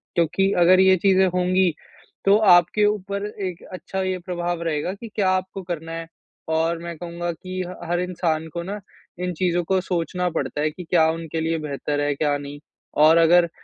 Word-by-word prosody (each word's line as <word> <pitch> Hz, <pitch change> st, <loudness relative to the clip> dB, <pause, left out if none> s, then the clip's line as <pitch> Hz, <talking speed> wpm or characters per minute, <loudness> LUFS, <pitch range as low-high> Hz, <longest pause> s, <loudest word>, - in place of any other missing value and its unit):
क्योंकि 195 Hz, +4 st, +2 dB
अगर 180 Hz, +2 st, +6 dB
ये 190 Hz, 0 st, +6 dB
चीज़ें 190 Hz, +1 st, +4 dB
होंगी 180 Hz, -1 st, +2 dB, 0.5 s
तो 200 Hz, +1 st, +6 dB, 0.2 s
आपके 175 Hz, +4 st, +4 dB
ऊपर 200 Hz, -1 st, -1 dB, 0.2 s
एक 180 Hz, -1 st, -7 dB
अच्छा 190 Hz, +1 st, -4 dB
ये 185 Hz, 0 st, -1 dB
प्रभाव 175 Hz, -1 st, -3 dB
रहेगा 165 Hz, +2 st, -1 dB
कि 215 Hz, +4 st, -9 dB
क्या 195 Hz, -3 st, +2 dB
आपको 185 Hz, +1 st, -1 dB
करना 165 Hz, -2 st, -5 dB
है 165 Hz, 0 st, -5 dB, 0.4 s
और 165 Hz, +1 st, +1 dB
मैं 170 Hz, 0 st, -6 dB
कहूँगा 175 Hz, +1 st, -4 dB
कि 185 Hz, +2 st, -6 dB
ह 180 Hz, -, -8 dB
हर 175 Hz, 0 st, +1 dB
इंसान 165 Hz, -3 st, -1 dB
को 170 Hz, -, -3 dB
ना 200 Hz, +4 st, -5 dB, 0.4 s
इन 180 Hz, 0 st, -2 dB
चीज़ों 175 Hz, +1 st, 0 dB
को 190 Hz, +3 st, +1 dB
सोचना 180 Hz, 0 st, -2 dB
पड़ता 145 Hz, -2 st, -3 dB
है 155 Hz, -, +1 dB
कि 180 Hz, +4 st, -9 dB
क्या 165 Hz, -1 st, +3 dB
उनके 165 Hz, 0 st, -4 dB
लिए 165 Hz, +1 st, 0 dB
बेहतर 145 Hz, 0 st, -3 dB
है 145 Hz, 0 st, +1 dB
क्या 145 Hz, 0 st, 0 dB
नहीं। 145 Hz, 0 st, -8 dB, 0.4 s
और 160 Hz, +2 st, +7 dB
अगर 170 Hz, +1 st, +6 dB
अ, -, -, -9 dB
175 Hz, 195 wpm, -23 LUFS, 165-185 Hz, 0.5 s, और